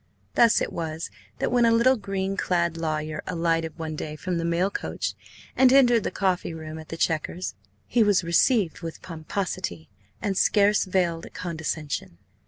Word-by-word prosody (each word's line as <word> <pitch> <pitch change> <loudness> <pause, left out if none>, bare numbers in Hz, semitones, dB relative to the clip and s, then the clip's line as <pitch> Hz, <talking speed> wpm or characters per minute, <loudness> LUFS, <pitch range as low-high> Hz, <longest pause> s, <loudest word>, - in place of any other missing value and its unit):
Thus 235 -1 +5
it - - -2
was 160 - -4 0.3
that, - - -1
when 245 -1 +4
a 230 - +5
little 235 +3 +5
green 195 -3 -3
clad 170 -3 0
lawyer 155 -2 -2
alighted 165 -2 0
one 160 -1 -4
day 150 0 -5
from 175 +3 -3
the - - -2
mail 170 +4 +1
coach - - -3 0.4
and 260 -1 +6
entered 245 -4 +5
the - - -1
coffee 185 -4 -1
room 160 0 -7
at 155 - -11
the 165 - -5
Chequers, 165 +3 -1 0.3
he 240 - +2
was 205 -4 +4
received 175 - +2
with 165 -1 -7
pomposity 160 - -4 0.3
and 200 -3 -1
scarce 205 +2 +4
veiled 175 -3 -1
condescension. 160 - -4
170 Hz, 165 wpm, -25 LUFS, 160-200 Hz, 0.4 s, and